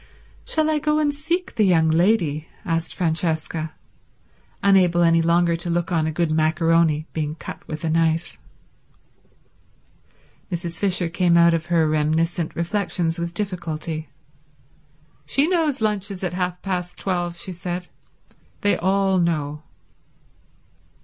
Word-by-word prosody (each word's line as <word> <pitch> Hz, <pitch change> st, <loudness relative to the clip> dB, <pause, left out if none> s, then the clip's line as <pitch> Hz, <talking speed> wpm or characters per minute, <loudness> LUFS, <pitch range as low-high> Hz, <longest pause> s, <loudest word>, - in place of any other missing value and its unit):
"Shall 315 Hz, -1 st, +1 dB
I 305 Hz, -, +1 dB
go 300 Hz, +1 st, +1 dB
and 295 Hz, -1 st, +1 dB
seek 340 Hz, +6 st, -2 dB
the 215 Hz, -, +2 dB
young 170 Hz, -5 st, +4 dB
lady?" 160 Hz, -3 st, +2 dB, 0.2 s
asked 165 Hz, -2 st, -2 dB
Francesca, 160 Hz, -2 st, -1 dB, 0.9 s
unable 180 Hz, -3 st, +4 dB
any 165 Hz, 0 st, +4 dB
longer 170 Hz, +1 st, +3 dB
to 175 Hz, +1 st, -4 dB
look 170 Hz, +1 st, -1 dB
on 160 Hz, -2 st, +1 dB
a -, -, -1 dB
good 165 Hz, 0 st, 0 dB
maccaroni 160 Hz, 0 st, +2 dB
being 155 Hz, -1 st, -2 dB
cut 165 Hz, -, -8 dB
with 155 Hz, +1 st, -6 dB
a -, -, 0 dB
knife. 165 Hz, +1 st, 0 dB, 2.1 s
Mrs. 170 Hz, -1 st, -4 dB
Fisher 185 Hz, -3 st, +2 dB
came 170 Hz, 0 st, +2 dB
out 170 Hz, 0 st, +6 dB
of 165 Hz, 0 st, -1 dB
her 165 Hz, -2 st, +3 dB
reminiscent 155 Hz, +2 st, 0 dB
reflections 170 Hz, -2 st, -1 dB
with 170 Hz, 0 st, -4 dB
difficulty. 165 Hz, -5 st, -4 dB, 1.2 s
"She 280 Hz, +3 st, +2 dB
knows 320 Hz, -8 st, +1 dB
lunch 210 Hz, -2 st, 0 dB
is 195 Hz, -2 st, -7 dB
at 180 Hz, -2 st, -2 dB
half 180 Hz, 0 st, -3 dB
past 180 Hz, -2 st, -3 dB
twelve," 175 Hz, -2 st, -2 dB
she 190 Hz, -, -4 dB
said. 175 Hz, 0 st, -5 dB, 0.7 s
"They 205 Hz, -3 st, +2 dB
all 190 Hz, +1 st, +2 dB
know." 150 Hz, -3 st, -1 dB
170 Hz, 135 wpm, -22 LUFS, 160-190 Hz, 2.1 s, out